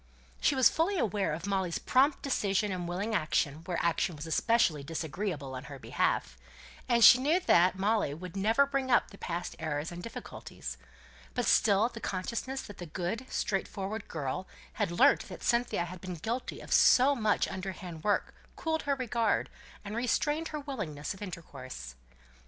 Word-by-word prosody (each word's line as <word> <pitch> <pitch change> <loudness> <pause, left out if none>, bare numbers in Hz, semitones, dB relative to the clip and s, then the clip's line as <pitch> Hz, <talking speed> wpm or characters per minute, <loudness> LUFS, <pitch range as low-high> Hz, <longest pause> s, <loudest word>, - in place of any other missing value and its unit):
She 285 - +2
was 260 -3 +7
fully 360 +5 +1
aware 205 - 0
of 160 +5 -4
Molly's 190 -4 0
prompt 275 +3 +2
decision 210 -6 +1
and 180 -2 -3
willing 195 +6 -2
action, 155 -4 0
where 180 -2 -2
action 170 0 +1
was 150 +1 -7
especially 165 -2 +2
disagreeable, 160 -1 -4
on 130 +1 -6
her 140 -1 -8
behalf; - - -1 0.6
she 250 +2 +10
knew 305 +7 +3
that 180 - +4
Molly 205 -4 +1
would 180 +2 -9
never 225 +8 +3
bring 275 -1 -2
up 240 - +3
the 195 - -13
past 175 +1 -4
errors 150 +1 -3
and 175 0 -7
difficulties; - - -8 0.6
but - - 0
still 210 +1 +4
the 235 -1 -9
consciousness 235 +8 -3
that 205 - -11
the 175 - -6
good, 185 +10 -3
straightforward 200 +1 -2
girl 150 +3 -4 0.3
had 205 -4 -1
learnt 175 - +4
that - - -9
Cynthia 235 -7 +1
had 175 0 -9
been 185 -1 -5
guilty 230 +10 -4
of - - -3
so 265 +3 +6
much 215 -4 +1
underhand 185 -4 -6
work 205 - +1 0.2
cooled 320 -1 -1
her 280 - +3
regard, 235 -4 0 0.3
and 205 +2 -5
restrained 295 +7 0
her 305 - -4
willingness 200 - -4
of 190 - -14
intercourse. 135 - -8
195 Hz, 165 wpm, -30 LUFS, 170-235 Hz, 0.6 s, she